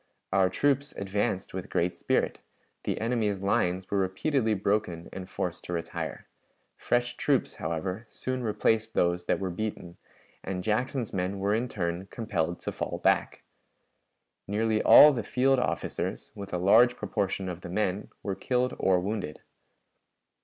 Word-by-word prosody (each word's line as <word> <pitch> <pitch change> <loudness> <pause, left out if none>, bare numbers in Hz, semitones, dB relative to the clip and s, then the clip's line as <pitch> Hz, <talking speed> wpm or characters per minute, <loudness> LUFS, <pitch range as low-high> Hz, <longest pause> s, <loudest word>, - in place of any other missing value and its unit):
Our 95 -1 +4
troops 140 +7 +1
advanced 100 -1 -2
with 95 +2 -5
great 90 +1 0
spirit; - - 0 0.5
the - - -1
enemy's 110 -4 0
lines 95 -1 0
were 100 - +2
repeatedly 110 +5 +1
broken 100 -4 -1
and 95 0 -7
forced 90 -1 -3
to 90 - -4
retire. 85 -1 -4 0.5
Fresh 120 0 0
troops, 140 -3 +1
however, 90 +7 -3
soon 130 0 -3
replaced 110 0 +1
those 85 0 +1
that - - +1
were 95 -2 -2
beaten, 90 -3 -5 0.5
and 90 -1 -3
Jackson's 120 +3 -1
men 95 +1 -1
were 100 +1 +1
in 115 +3 0
turn 90 -3 -3
compelled 90 -7 -2
to - - -3
fall - - -3
back. - - +2 1.0
Nearly 110 +2 +1
all 150 0 +9
the 120 - -1
field 135 +1 +2
officers, 125 - -3
with 100 -1 -8
a 90 - -1
large 115 +7 +5
proportion 95 -2 -2
of 90 -1 -5
the 85 - -8
men, 95 +1 -1
were 100 - -1
killed 125 +6 0
or 95 -1 +3
wounded. 95 -5 -4
100 Hz, 150 wpm, -28 LUFS, 90-115 Hz, 1.0 s, all